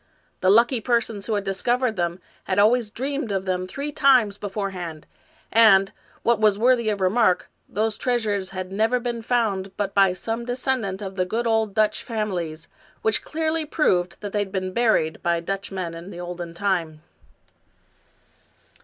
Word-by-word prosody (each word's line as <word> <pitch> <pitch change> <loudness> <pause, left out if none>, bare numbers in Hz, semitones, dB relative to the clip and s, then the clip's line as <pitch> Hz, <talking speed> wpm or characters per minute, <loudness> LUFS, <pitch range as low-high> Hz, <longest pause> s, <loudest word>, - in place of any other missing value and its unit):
The 185 - +2
lucky 235 +4 +4
persons 230 -3 0
who 220 - 0
had 205 - -1
discovered 240 +5 0
them 175 -1 -2 0.3
had 185 - -1
always 220 +2 +4
dreamed 270 +1 -3
of 195 -1 -1
them 185 -1 -1
three 280 +9 -5
times 255 -8 +4
beforehand, 190 -6 -5 0.5
and, 195 -4 +6 0.3
what 235 -2 +3
was 210 -2 +4
worthy 235 0 +3
of 205 -2 -2
remark, 190 0 +2 0.2
those 215 +1 -1
treasures 215 -6 0
had 185 -1 -6
never 220 +5 +1
been 240 -1 -3
found 215 -5 0
but 200 -1 -2
by 195 -2 +4
some 225 +5 -4
descendant 245 -5 -2
of 190 0 -7
the 185 - +1
good 230 +5 -1
old 220 -3 +1
Dutch 215 -1 +2
families, 180 -8 -4 0.4
which 220 - +2
clearly 320 0 -1
proved 185 - 0
that 205 -2 -6
they 210 - +1
had 200 -2 -2
been 185 -1 -3
buried 220 -9 +1
by 170 0 +1
Dutch 195 +4 -4
men 185 -3 -4
in 170 +3 -9
the 175 - -9
olden 175 -1 -6
time. 170 -5 -1
205 Hz, 165 wpm, -24 LUFS, 185-235 Hz, 0.5 s, and